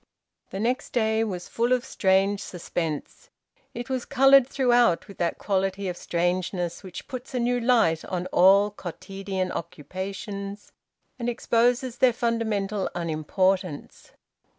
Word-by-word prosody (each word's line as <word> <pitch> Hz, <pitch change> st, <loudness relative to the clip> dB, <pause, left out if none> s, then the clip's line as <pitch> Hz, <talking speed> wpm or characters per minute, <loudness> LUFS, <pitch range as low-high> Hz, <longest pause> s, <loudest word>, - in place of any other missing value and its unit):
The 195 Hz, -, -5 dB
next 245 Hz, +4 st, -1 dB
day 220 Hz, -2 st, +2 dB
was 185 Hz, -5 st, -4 dB
full 235 Hz, +2 st, 0 dB
of 255 Hz, 0 st, +2 dB
strange 195 Hz, +1 st, +2 dB
suspense; 165 Hz, -5 st, -5 dB, 0.5 s
it 240 Hz, +1 st, -5 dB
was 260 Hz, -2 st, -2 dB
coloured 270 Hz, -1 st, +5 dB
throughout 245 Hz, -10 st, +3 dB
with 200 Hz, -, -13 dB
that 170 Hz, -1 st, 0 dB
quality 195 Hz, 0 st, -1 dB
of 180 Hz, -, -3 dB
strangeness 175 Hz, 0 st, -1 dB
which 185 Hz, -3 st, -9 dB
puts 255 Hz, 0 st, -7 dB
a -, -, +1 dB
new 245 Hz, +1 st, +1 dB
light 230 Hz, -10 st, +3 dB
on 180 Hz, -1 st, -3 dB
all 195 Hz, +3 st, +5 dB
quotidian 195 Hz, 0 st, -5 dB
occupations 195 Hz, +4 st, -6 dB, 0.5 s
and 240 Hz, 0 st, -1 dB
exposes 240 Hz, +1 st, +1 dB
their 255 Hz, -2 st, +5 dB
fundamental 220 Hz, -4 st, -1 dB
unimportance. 175 Hz, +1 st, -1 dB
200 Hz, 130 wpm, -26 LUFS, 185-240 Hz, 0.5 s, coloured